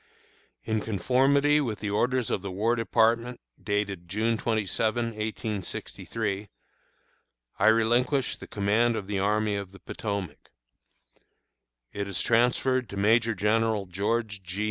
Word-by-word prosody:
In 110 Hz, -1 st, -1 dB
conformity 135 Hz, +8 st, +3 dB
with 115 Hz, -7 st, -3 dB
the 105 Hz, -1 st, -3 dB
orders 125 Hz, +3 st, +1 dB
of -, -, 0 dB
the 100 Hz, -, -5 dB
War 105 Hz, +6 st, +1 dB
Department, 115 Hz, +1 st, +1 dB, 0.2 s
dated 100 Hz, -3 st, -2 dB
June 110 Hz, +4 st, +1 dB
27, 110 Hz, +1 st, 0 dB
1863, 105 Hz, -1 st, -4 dB, 1.1 s
I -, -, +4 dB
relinquish 120 Hz, +4 st, +3 dB
the -, -, -11 dB
command 115 Hz, +2 st, +1 dB
of 105 Hz, -, -4 dB
the 100 Hz, 0 st, -2 dB
Army 105 Hz, +1 st, +1 dB
of 100 Hz, -2 st, -5 dB
the 95 Hz, -, -13 dB
Potomac. 100 Hz, -7 st, -5 dB, 1.4 s
It 100 Hz, 0 st, -3 dB
is 100 Hz, -3 st, -2 dB
transferred 125 Hz, +1 st, +2 dB
to 100 Hz, -, -7 dB
Major 115 Hz, +3 st, +3 dB
General 105 Hz, +1 st, +1 dB
George 105 Hz, +3 st, -2 dB
G. 90 Hz, +2 st, -7 dB
110 Hz, 125 wpm, -27 LUFS, 100-115 Hz, 1.4 s, I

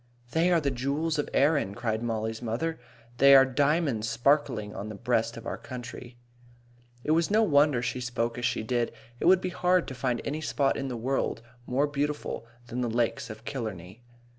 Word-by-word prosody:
"They 165 Hz, +2 st, +3 dB
are 170 Hz, -, +5 dB
the 140 Hz, -3 st, 0 dB
jewels 145 Hz, +5 st, -1 dB
of 145 Hz, -, -1 dB
Erin," 140 Hz, -9 st, +2 dB
cried 115 Hz, -2 st, -2 dB
Mollie's 110 Hz, -1 st, -2 dB
mother. 125 Hz, +8 st, -2 dB, 0.4 s
"They 140 Hz, 0 st, +8 dB
are 135 Hz, 0 st, +8 dB
diamonds 140 Hz, -4 st, +1 dB
sparkling 120 Hz, -4 st, +1 dB
on 105 Hz, -, -6 dB
the 105 Hz, -, -6 dB
breast 115 Hz, +2 st, 0 dB
of 115 Hz, -, -9 dB
our -, -, -4 dB
country." 125 Hz, -1 st, -8 dB, 0.9 s
It 150 Hz, -, 0 dB
was 165 Hz, +1 st, +3 dB
no 215 Hz, +2 st, +4 dB
wonder 145 Hz, -, +3 dB
she 125 Hz, -, -2 dB
spoke 120 Hz, -1 st, -2 dB
as 120 Hz, -, -2 dB
she 120 Hz, -3 st, 0 dB
did. 120 Hz, +1 st, 0 dB, 0.3 s
It -, -, -2 dB
would 185 Hz, +1 st, +6 dB
be 185 Hz, -, -2 dB
hard 180 Hz, 0 st, +2 dB
to -, -, -6 dB
find 125 Hz, -1 st, -1 dB
any 150 Hz, +2 st, -3 dB
spot 140 Hz, -2 st, +1 dB
in 135 Hz, -, -3 dB
the 125 Hz, -2 st, -4 dB
world 120 Hz, -1 st, -1 dB, 0.2 s
more 135 Hz, +4 st, +2 dB
beautiful 145 Hz, -4 st, -3 dB, 0.2 s
than 120 Hz, +1 st, -4 dB
the 120 Hz, -, 0 dB
Lakes 115 Hz, +1 st, -1 dB
of 110 Hz, +1 st, -10 dB
Killarney. 110 Hz, -6 st, -6 dB
125 Hz, 190 wpm, -28 LUFS, 115-145 Hz, 0.9 s, They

